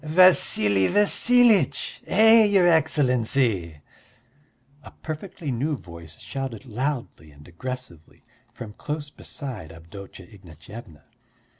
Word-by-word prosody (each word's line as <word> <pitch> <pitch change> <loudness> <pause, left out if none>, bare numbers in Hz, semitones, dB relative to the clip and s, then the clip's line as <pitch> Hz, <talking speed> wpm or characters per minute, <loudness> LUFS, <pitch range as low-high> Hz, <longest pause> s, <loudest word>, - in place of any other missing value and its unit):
"Vassili 145 - +3
Vassilitch! 225 +2 +2
Hey, 220 +2 +5
your 195 -3 +3
Excellency!" 125 - 0 1.0
a - - -13
perfectly 160 -1 -8
new 140 +5 -3
voice 85 -5 -13
shouted 135 -4 -7
loudly 125 - -5
and 75 0 -18
aggressively 90 -3 -10 0.3
from 110 -4 -11
close 145 +4 -7
beside 125 - -9
Avdotya 90 +3 -13
Ignatyevna. 90 -2 -14
125 Hz, 95 wpm, -23 LUFS, -, 1.0 s, Hey